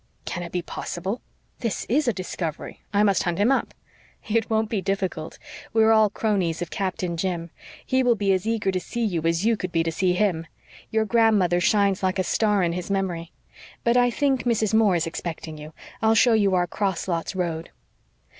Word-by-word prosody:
"Can 175 Hz, -, -4 dB
it 170 Hz, -1 st, -6 dB
be 180 Hz, -1 st, -2 dB
possible? 190 Hz, +7 st, -4 dB, 0.4 s
This 225 Hz, -8 st, -2 dB
IS 280 Hz, +4 st, +1 dB
a -, -, +4 dB
discovery. 180 Hz, -5 st, -5 dB
I 205 Hz, 0 st, +3 dB
must 200 Hz, -3 st, +3 dB
hunt 175 Hz, -1 st, -1 dB
him 210 Hz, +6 st, +3 dB
up." 270 Hz, -, +1 dB, 0.6 s
"It 225 Hz, 0 st, 0 dB
won't 220 Hz, 0 st, +1 dB
be 215 Hz, -3 st, -2 dB
difficult; 190 Hz, -5 st, -3 dB, 0.4 s
we 225 Hz, 0 st, +4 dB
are 220 Hz, -, +5 dB
all 220 Hz, -1 st, +5 dB
cronies 195 Hz, -6 st, 0 dB
of 175 Hz, -1 st, -5 dB
Captain 185 Hz, -3 st, -2 dB
Jim. 170 Hz, -2 st, -2 dB, 0.3 s
He 260 Hz, 0 st, +2 dB
will 245 Hz, -2 st, +3 dB
be 200 Hz, -2 st, +1 dB
as 190 Hz, +3 st, -1 dB
eager 220 Hz, -4 st, +1 dB
to 185 Hz, -, -1 dB
see 235 Hz, +5 st, -3 dB
you 175 Hz, -6 st, -1 dB
as 165 Hz, +4 st, 0 dB
you 230 Hz, 0 st, +4 dB
could 185 Hz, -3 st, -5 dB
be 165 Hz, -1 st, +2 dB
to 165 Hz, -, -1 dB
see 180 Hz, +2 st, +1 dB
him. 180 Hz, -4 st, 0 dB, 0.4 s
Your 220 Hz, 0 st, +1 dB
grandmother 215 Hz, -6 st, +3 dB
shines 200 Hz, 0 st, +2 dB
like 185 Hz, 0 st, 0 dB
a 185 Hz, -, +1 dB
star 210 Hz, 0 st, +2 dB
in 170 Hz, -1 st, +1 dB
his 180 Hz, +1 st, -5 dB
memory. 180 Hz, -4 st, -2 dB, 0.5 s
But 235 Hz, +1 st, +3 dB
I 245 Hz, 0 st, +5 dB
think 270 Hz, +1 st, +1 dB
Mrs. 220 Hz, -3 st, 0 dB
Moore 220 Hz, -4 st, +4 dB
is 165 Hz, 0 st, +1 dB
expecting 165 Hz, -1 st, -6 dB
you. 150 Hz, +1 st, -9 dB, 0.3 s
I'll 220 Hz, 0 st, +4 dB
show 235 Hz, +2 st, +5 dB
you 200 Hz, -4 st, +3 dB
our 180 Hz, -1 st, +2 dB
'cross 190 Hz, +1 st, -2 dB
lots' 170 Hz, +2 st, -2 dB
road." 170 Hz, -3 st, -2 dB
195 Hz, 205 wpm, -24 LUFS, 175-220 Hz, 0.6 s, are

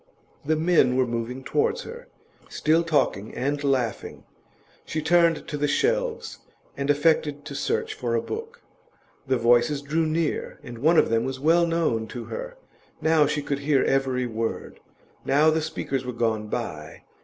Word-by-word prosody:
The 155 Hz, +2 st, +1 dB
men 155 Hz, -6 st, +3 dB
were 130 Hz, -, +3 dB
moving 120 Hz, +2 st, -4 dB
towards 460 Hz, -, 0 dB
her, 475 Hz, +2 st, -10 dB, 0.4 s
still 160 Hz, +2 st, +2 dB
talking 145 Hz, -10 st, 0 dB
and 145 Hz, +3 st, -2 dB
laughing. 130 Hz, -5 st, -1 dB, 0.6 s
She 155 Hz, -, -4 dB
turned 165 Hz, 0 st, +3 dB
to 150 Hz, -, -4 dB
the 145 Hz, 0 st, 0 dB
shelves, 480 Hz, -, -1 dB, 0.4 s
and 140 Hz, 0 st, -3 dB
affected 145 Hz, -1 st, +2 dB
to 150 Hz, -, -7 dB
search 140 Hz, -, -1 dB
for 120 Hz, -2 st, -2 dB
a 115 Hz, -, +1 dB
book. 460 Hz, +2 st, -7 dB, 0.6 s
The 130 Hz, -1 st, +2 dB
voices 120 Hz, +4 st, +3 dB
drew 155 Hz, +3 st, 0 dB
near, 160 Hz, 0 st, -2 dB
and 120 Hz, -1 st, -9 dB
one 160 Hz, +6 st, +4 dB
of -, -, +4 dB
them 115 Hz, 0 st, +2 dB
was 130 Hz, 0 st, -4 dB
well 165 Hz, +4 st, +3 dB
known 160 Hz, -10 st, 0 dB
to 120 Hz, +2 st, -7 dB
her; -, -, -6 dB, 0.4 s
now 160 Hz, -2 st, +3 dB
she 145 Hz, 0 st, -2 dB
could 140 Hz, -1 st, -2 dB
hear 140 Hz, -1 st, +2 dB
every 130 Hz, -2 st, +1 dB
word; 115 Hz, -1 st, -4 dB, 0.4 s
now 150 Hz, +3 st, +4 dB
the 160 Hz, 0 st, +1 dB
speakers 150 Hz, -4 st, -3 dB
were 125 Hz, 0 st, -5 dB
gone 110 Hz, -2 st, -1 dB
by. 80 Hz, -10 st, -5 dB
145 Hz, 165 wpm, -25 LUFS, 125-165 Hz, 0.6 s, one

